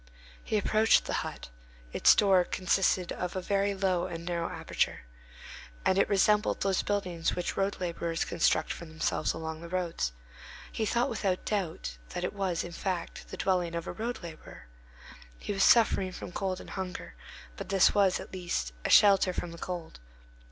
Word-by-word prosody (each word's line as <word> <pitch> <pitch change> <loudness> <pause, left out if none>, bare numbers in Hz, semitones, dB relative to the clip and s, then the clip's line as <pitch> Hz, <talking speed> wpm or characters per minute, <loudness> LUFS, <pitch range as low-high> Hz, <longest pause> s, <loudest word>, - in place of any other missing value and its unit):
He 215 - 0
approached 215 +2 +3
the - - -3
hut; - - -7 0.4
its - - +6
door 190 -3 +5
consisted 185 0 +1
of 180 0 -4
a - - 0
very 200 +1 0
low 190 -2 0
and 165 0 -7
narrow 170 -1 -2
aperture, - - -2 0.8
and 190 - +3
it - - +3
resembled 210 +1 +3
those 195 -1 +2
buildings 180 -5 -1
which 180 - -2
road 195 +1 -1
laborers 170 -2 -2
construct - - +1
for 170 - -9
themselves 160 -1 -1
along 160 0 -5
the 170 - -8
roads. 175 - -1 0.6
He 220 - -1
thought 240 +3 +2
without 195 -5 -1
doubt, 160 - -3 0.2
that - - -2
it - - -2
was, 190 -4 -1
in 175 - -7
fact, 175 0 -4
the - - -8
dwelling 180 -3 0
of 170 - -3
a - - -5
road 230 -1 -4
laborer; 160 - -10 0.7
he 205 - -4
was 195 - +2
suffering 205 -5 +5
from 180 - -7
cold 185 0 -2
and - - -10
hunger, 185 -2 -5 0.4
but - - -7
this 195 -1 +5
was, 195 -3 +3
at - - -10
least, 170 - -3
a - - -1
shelter 195 -3 +6
from 175 -1 -4
the 170 - -10
cold. 175 - -6
185 Hz, 175 wpm, -29 LUFS, 170-195 Hz, 0.8 s, its